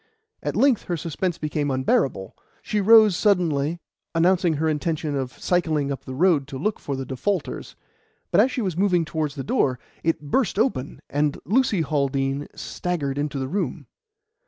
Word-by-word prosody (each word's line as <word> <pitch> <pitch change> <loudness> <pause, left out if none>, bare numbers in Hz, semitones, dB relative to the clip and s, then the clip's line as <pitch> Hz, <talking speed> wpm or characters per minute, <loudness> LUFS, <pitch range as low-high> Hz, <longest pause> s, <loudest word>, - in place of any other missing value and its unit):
At - - -3
length 270 -5 +3
her 175 - -2
suspense 170 +3 -2
became 150 -1 -2
unbearable; 130 -6 0 0.3
she 210 - 0
rose 215 -1 +7
suddenly, 170 -6 +1 0.4
announcing 175 0 +3
her 160 +2 0
intention 155 0 -1
of 130 -2 -3
cycling 155 -5 0
up 135 - -5
the 130 - -6
road 160 -3 +3
to 135 - -6
look 210 +10 -1
for 140 - -4
the 135 0 -4
defaulters, 145 +8 -3 0.6
but 185 - +6
as 245 - +3
she 245 - -2
was 185 -5 -2
moving 180 -2 +2
towards 155 -2 -2
the 135 - -4
door, 130 -1 +1 0.3
it 165 0 +1
burst 240 -8 +1
open, 210 - -1
and 145 +1 0
Lucy 215 - +2
Haldean 140 -1 -1
staggered 145 -6 -3
into 145 -1 -2
the 130 -1 -2
room. 195 +9 -3
155 Hz, 165 wpm, -24 LUFS, 140-185 Hz, 0.6 s, rose